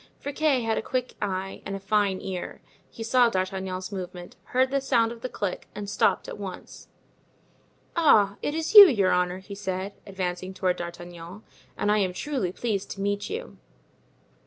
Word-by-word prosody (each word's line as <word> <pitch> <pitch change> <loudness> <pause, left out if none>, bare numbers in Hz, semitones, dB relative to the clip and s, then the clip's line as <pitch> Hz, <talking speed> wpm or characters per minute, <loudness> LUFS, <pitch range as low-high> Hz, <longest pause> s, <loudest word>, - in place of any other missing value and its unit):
Friquet 285 -3 +1
had 225 -1 +1
a - - -3
quick 250 +2 -2
eye 195 -1 -3
and 195 - -4
a - - -5
fine 195 -1 +1
ear. 185 -2 -5 0.3
He 225 - -8
saw 240 +1 +4
D'Artagnan's 185 -1 -3
movement, 180 -2 -7
heard 260 +1 +1
the 275 0 +1
sound 235 -4 +2
of 235 -1 -9
the 255 - -4
click, 200 -6 -4
and 205 -1 -5
stopped - - +1
at - - -7
once. 190 -3 -8 1.1
"Ah! 210 - +4
it 290 - -2
is 320 +4 -2
you, 410 -2 +13
your 200 - +2
honor," 180 0 +1
he 190 +2 -10
said, 195 0 -4
advancing 185 -1 -4
toward 185 -1 0
D'Artagnan; 175 +3 -8 0.3
"and 205 - +1
I 210 - +3
am 185 -2 0
truly 250 -4 -2
pleased 205 -1 -2
to 195 - -8
meet 205 0 -1
you." 460 +4 -6
200 Hz, 175 wpm, -26 LUFS, 185-235 Hz, 1.1 s, you